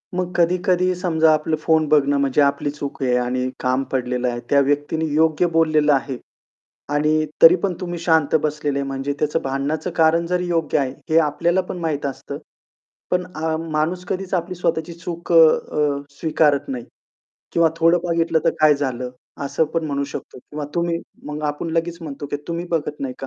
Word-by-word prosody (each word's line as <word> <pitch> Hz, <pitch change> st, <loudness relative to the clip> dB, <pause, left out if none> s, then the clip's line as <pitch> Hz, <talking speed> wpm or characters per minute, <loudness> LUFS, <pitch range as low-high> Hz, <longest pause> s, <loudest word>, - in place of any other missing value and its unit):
मग 180 Hz, -1 st, -2 dB
कधी-कधी 180 Hz, +1 st, +2 dB
समजा 160 Hz, -3 st, +2 dB
आपलं 155 Hz, +1 st, 0 dB
फोन 160 Hz, -1 st, +2 dB
बघणं 145 Hz, -1 st, +3 dB
म्हणजे 140 Hz, +1 st, +2 dB
आपली 140 Hz, 0 st, +1 dB
चूक 145 Hz, -1 st, -7 dB
आहे 125 Hz, -1 st, +2 dB
आणि 125 Hz, +1 st, -1 dB
काम 130 Hz, +1 st, 0 dB
पडलेलं 125 Hz, -1 st, -1 dB
आहे. 120 Hz, 0 st, -3 dB
त्या 140 Hz, -, +5 dB
व्यक्तीने 145 Hz, +3 st, 0 dB
योग्य 160 Hz, +2 st, +3 dB
बोललेलं 155 Hz, -3 st, +3 dB
आहे. 135 Hz, -1 st, -1 dB, 0.8 s
आणि 155 Hz, +1 st, +2 dB, 0.2 s
तरी 165 Hz, +2 st, +9 dB
पण 195 Hz, -2 st, +1 dB
तुम्ही 175 Hz, -1 st, -4 dB
शांत 160 Hz, -3 st, +2 dB
बसलेले 145 Hz, -2 st, -1 dB
म्हणजे 135 Hz, +1 st, -3 dB
त्याचं 150 Hz, +2 st, 0 dB
भांडण्याचं 140 Hz, +5 st, -2 dB
कारण 165 Hz, +1 st, +3 dB
जरी 180 Hz, 0 st, -1 dB
योग्य 165 Hz, -3 st, 0 dB
आहे 135 Hz, -2 st, -1 dB, 0.2 s
हे 160 Hz, -, +3 dB
आपल्याला 170 Hz, +4 st, +1 dB
पण 180 Hz, 0 st, -7 dB
माहीत 155 Hz, -4 st, -2 dB
असतं. 135 Hz, -2 st, -5 dB, 0.7 s
पण 180 Hz, 0 st, +1 dB
अ, 160 Hz, 0 st, -1 dB
माणूस 160 Hz, +4 st, -1 dB
कधीच 190 Hz, 0 st, -3 dB
आपली 180 Hz, +1 st, -2 dB
स्वतःची 170 Hz, -1 st, -1 dB
चूक 170 Hz, 0 st, -6 dB
अ, -, -, +5 dB, 0.4 s
अ, 145 Hz, -2 st, 0 dB, 0.2 s
स्वीकारत 150 Hz, -3 st, +2 dB
नाही. 125 Hz, -3 st, -4 dB, 0.7 s
किंवा 170 Hz, -1 st, +4 dB
"थोडं 165 Hz, +1 st, +4 dB
बघितलं 165 Hz, -1 st, +1 dB
तर -, -, +4 dB
काय 155 Hz, -1 st, +6 dB
झालं?" 130 Hz, -3 st, -3 dB, 0.3 s
असं 140 Hz, +3 st, +1 dB
पण 165 Hz, -1 st, 0 dB
म्हणू 140 Hz, -1 st, -1 dB
शकतो 140 Hz, -, -8 dB
किंवा 150 Hz, +4 st, -7 dB
तुम्ही 170 Hz, -1 st, 0 dB, 0.3 s
मग 150 Hz, +1 st, -5 dB
आपण 150 Hz, +3 st, -2 dB
लगेच 165 Hz, +1 st, -1 dB
म्हणतो 145 Hz, -2 st, -6 dB
की 145 Hz, -, -3 dB
"तुम्ही 170 Hz, +1 st, -3 dB
बघत 150 Hz, -3 st, -2 dB
नाही 130 Hz, -2 st, -3 dB
का?" 135 Hz, -, -6 dB
155 Hz, 180 wpm, -21 LUFS, 140-170 Hz, 0.8 s, तरी